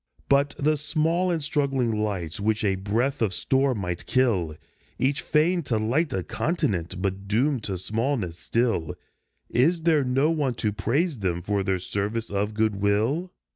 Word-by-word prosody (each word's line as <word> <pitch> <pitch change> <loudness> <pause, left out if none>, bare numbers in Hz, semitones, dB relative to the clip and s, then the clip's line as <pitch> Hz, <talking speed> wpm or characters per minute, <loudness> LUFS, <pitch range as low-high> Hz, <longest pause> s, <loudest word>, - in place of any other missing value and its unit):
But 140 +1 +3
the 150 +2 +2
small 165 +4 0
and 165 -4 0
struggling 135 -7 0
lights 90 -6 -3
which 110 +1 0
a 100 -2 +2
breath 115 +9 -1
of 100 -5 +1
storm 130 -2 +1
might 90 -2 -4
kill, 95 - +1 0.4
Each 140 +2 +1
fain 170 +4 +2
to 115 - 0
light 130 +10 +1
a 95 - -1
continent, 95 - -1
but 95 0 -2
doomed 125 +5 +1
to 95 -3 -2
smallness 110 -3 -2
still, 115 -9 0 0.6
Is 160 +7 +2
there 160 -4 +4
no 135 +5 +2
one 145 -6 0
to 105 -2 -1
praise 130 - 0
them 90 -3 -1
for 100 +1 0
their 95 -1 0
service 100 +5 -3
of 105 +1 -1
good 110 -2 +1
will? 110 - +1
115 Hz, 165 wpm, -25 LUFS, 100-145 Hz, 0.6 s, there